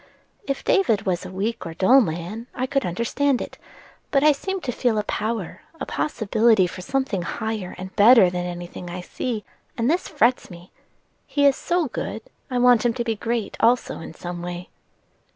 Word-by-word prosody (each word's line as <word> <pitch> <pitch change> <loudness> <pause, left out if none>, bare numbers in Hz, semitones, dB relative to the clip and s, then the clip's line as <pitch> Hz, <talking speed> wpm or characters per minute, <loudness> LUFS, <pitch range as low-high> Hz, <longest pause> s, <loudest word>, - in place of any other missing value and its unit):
If 275 - -2
David 230 - +2
was 180 -3 -1
a - - -10
weak 200 +3 -2
or 165 -2 -7
dull 255 +10 +6
man 180 +5 -4
I 255 - -1
could 275 -4 0
understand 240 +8 0
it; - - -7 0.5
but 275 -1 +2
I 305 - +7
seem 380 +7 -3
to 250 - -2
feel 240 -2 0
a 210 - +1
power, 215 -3 -3 0.2
a - - -3
possibility 220 -6 +2
for 180 +1 -6
something 260 -2 -1
higher 215 +1 -4
and 185 +1 -8
better 220 -1 +7
than 180 0 -3
any 175 0 -5
thing 175 0 -9
I 180 +1 -5
see, 220 +4 -4 0.3
and 235 +4 +2
this 350 - 0
frets 255 -5 +1
me. 175 0 -12 0.6
He 285 -1 +2
is 280 -1 +6
so 350 -3 0
good, 220 -2 -5 0.3
I 250 - -1
want 245 -2 +5
him 240 -1 +1
to 240 - -1
be 225 -1 -1
great 230 -1 -2
also 240 +2 +2
in - - -9
some 175 0 -6
way." 175 0 -6
225 Hz, 190 wpm, -23 LUFS, 185-255 Hz, 0.6 s, I